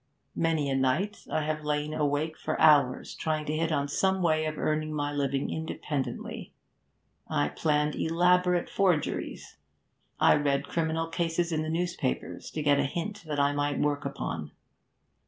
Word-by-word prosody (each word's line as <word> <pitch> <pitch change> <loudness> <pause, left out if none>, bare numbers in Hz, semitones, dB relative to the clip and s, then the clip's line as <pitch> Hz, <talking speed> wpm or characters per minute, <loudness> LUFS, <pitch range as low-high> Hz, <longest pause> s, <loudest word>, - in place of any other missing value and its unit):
Many 160 -3 +1
a 135 - 0
night 155 +11 0
I 155 - +1
have 155 0 -2
lain 150 0 -1
awake 150 +1 0
for - - -3
hours, 145 -5 +4
trying 155 -1 -2
to 150 - -2
hit 165 +1 0
on 140 -2 +1
some 190 +5 +1
way 155 -2 +2
of 155 0 -3
earning 155 0 0
my 145 -1 -2
living 140 -1 -1
independently. 155 -3 -4 0.7
I 75 0 +1
planned 150 - +1
elaborate 180 +1 +2
forgeries. 180 -6 -1 0.6
I - - +6
read 140 -1 0
criminal 165 0 0
cases 170 +1 -1
in 155 -1 0
the 155 - -3
newspapers 170 -5 -2
to 155 - -4
get 145 -1 +4
a - - +3
hint 200 +6 -4
that 150 -2 -2
I 140 0 +3
might 145 0 0
work 145 0 0
upon. 80 - -4
155 Hz, 155 wpm, -28 LUFS, 145-165 Hz, 0.7 s, I